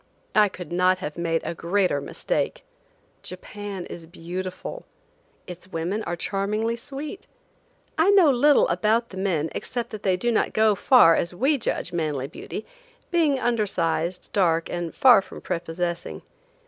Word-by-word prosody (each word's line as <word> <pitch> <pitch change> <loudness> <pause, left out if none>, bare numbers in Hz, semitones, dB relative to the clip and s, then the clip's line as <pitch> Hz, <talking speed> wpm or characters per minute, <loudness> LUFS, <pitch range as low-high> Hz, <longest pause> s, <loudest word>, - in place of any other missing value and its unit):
I 210 -1 +5
could 180 -2 -9
not 180 +1 +3
have 150 -5 -6
made 165 -1 -1
a - - -2
greater 175 -3 0
mistake. - - -2 0.6
Japan 205 -3 -7
is 165 -1 -9
beautiful. 185 - -6 0.6
Its 180 +1 -10
women 185 +4 -2
are 175 - -2
charmingly 210 +5 -1
sweet. 285 - -8 0.7
I 330 +5 +5
know 380 -7 +6
little 285 +3 +4
about 225 +2 +1
the 190 - -10
men 170 -5 0
except 240 -2 -4
that 215 - -7
they 185 -2 +1
do 240 +5 0
not 225 - +1
go 220 0 +4
far 200 -5 +6
as 170 +1 -2
we 275 +8 +2
judge - - -2
manly 150 -6 -1
beauty, - - -7 0.5
being 320 -6 +3
undersized, 185 -7 -1
dark, 165 -4 +2
and 175 -1 -4
far 250 -6 +7
from - - -11
prepossessing. 170 0 -4
190 Hz, 150 wpm, -24 LUFS, 170-230 Hz, 0.7 s, far